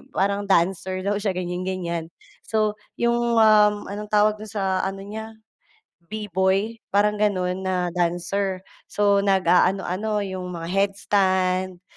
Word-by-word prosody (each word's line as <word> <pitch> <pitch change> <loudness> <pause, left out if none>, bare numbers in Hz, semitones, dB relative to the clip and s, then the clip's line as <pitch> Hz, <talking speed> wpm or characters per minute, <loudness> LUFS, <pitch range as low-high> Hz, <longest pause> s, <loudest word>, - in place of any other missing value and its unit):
parang 200 +1 0
dancer 185 +1 +1
daw 205 +1 0
siya 200 -3 -1
ganiyan-ganiyan, 180 -2 -3 0.4
so 215 -1 +1 0.2
'yong, 235 0 +1
um, 210 -2 +5
anong 210 +1 -5
tawag 210 0 +2
do'n 215 - -8
sa 195 -3 -1
ano 195 0 -6
niya, 220 +2 -7 0.7
B-boy 205 +1 -1 0.2
parang 210 +1 +3
gano'n 185 -3 0
na 180 -1 0
dancer, 180 +2 -1 0.3
so 200 -1 +2
nag-aano-ano, 195 +2 +2
'yong 190 -2 -5
mga 165 0 -6
headstand, 190 -2 +1
195 Hz, 120 wpm, -23 LUFS, 185-210 Hz, 0.7 s, um